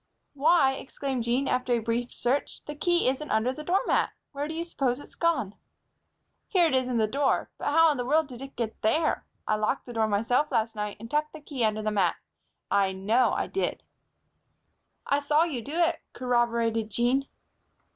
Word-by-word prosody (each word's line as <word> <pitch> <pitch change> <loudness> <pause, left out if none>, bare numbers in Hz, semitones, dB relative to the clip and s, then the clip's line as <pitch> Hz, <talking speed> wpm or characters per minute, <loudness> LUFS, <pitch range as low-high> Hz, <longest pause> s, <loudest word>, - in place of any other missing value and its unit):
"Why!" 285 -1 +4
exclaimed 265 -2 -4
Jean, 250 +4 +1
after 250 0 +1
a - - +3
brief 230 +2 -2
search, 255 +4 -2
"the 295 - -5
key 345 +2 +2
isn't 270 +4 -1
under 220 +4 +1
the 305 - -8
doormat! 380 +8 +2 0.2
Where 285 +1 -3
do 320 - -5
you 335 - -2
s'pose 265 -6 -1
it's - - -13
gone?" 330 - 0 0.9
"Here 360 -4 +4
it 320 - +1
is 260 -1 +2
in 250 -2 -1
the 220 - +3
door. 270 +5 0
But - - -5
how 325 +2 +5
in 290 - -2
the 245 - -2
world 310 +5 +3
did 255 -3 -11
it 270 0 -9
get 225 -2 -4
there? 310 +9 +1 0.2
I 215 - +2
locked 215 +5 -1
that 245 - -8
door 220 -1 +1
myself 230 +8 +1
last 225 0 0
night 210 -1 -4
and 230 +2 -9
tucked 300 +1 0
the 310 - -8
key 285 -4 -4
under 215 0 +1
the 215 - 0
mat. 195 -5 +2 0.6
I 195 -1 +3
know 215 +7 +2
I - - 0
did." 390 - -2 1.2
"I 280 - +2
saw 295 +2 +3
you 295 -8 -2
do 285 +7 -7
it," 340 -1 +2
corroborated 235 -3 0
Jean. 245 +6 +1
255 Hz, 195 wpm, -27 LUFS, 230-295 Hz, 1.2 s, how